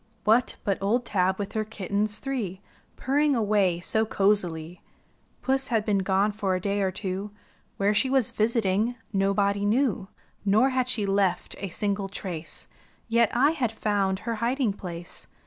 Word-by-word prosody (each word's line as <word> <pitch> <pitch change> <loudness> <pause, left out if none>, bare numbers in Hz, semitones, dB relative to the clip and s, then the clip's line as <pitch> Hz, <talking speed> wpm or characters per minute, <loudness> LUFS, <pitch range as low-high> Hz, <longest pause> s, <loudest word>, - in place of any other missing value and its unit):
What, 225 +4 +3
but 195 -2 -1
old 230 +5 +1
Tab 190 -2 +1
with 200 -1 -4
her 220 - 0
kittens 210 0 -2
three 230 -9 -3 0.4
Purring 285 +2 +2
away 205 -6 +2
so 220 +5 +1
cozily. 180 -6 0 0.6
Puss 265 0 +1
had 225 -3 0
been 205 -2 +2
gone 195 +2 +2
for 200 -3 -1
a - - -1
day 200 +2 -1
or 190 - +2
two, 190 +1 -4 0.5
Where 200 +1 +2
she 260 +5 +2
was 265 -4 +3
visiting 220 0 +1 0.2
nobody 200 +1 +1
knew; 215 -2 +1 0.4
Nor 215 +6 +4
had 255 -1 +1
she 230 -5 +1
left 195 -2 0
a 195 - -4
single 200 +1 -2
trace. 180 -5 -6 0.4
Yet 235 -1 +4
I 275 +5 +5
had 265 -8 -1
found 200 -3 0
her 230 -1 -3
hiding 240 -2 +1
place. 175 -3 -8
205 Hz, 160 wpm, -26 LUFS, 195-230 Hz, 0.6 s, I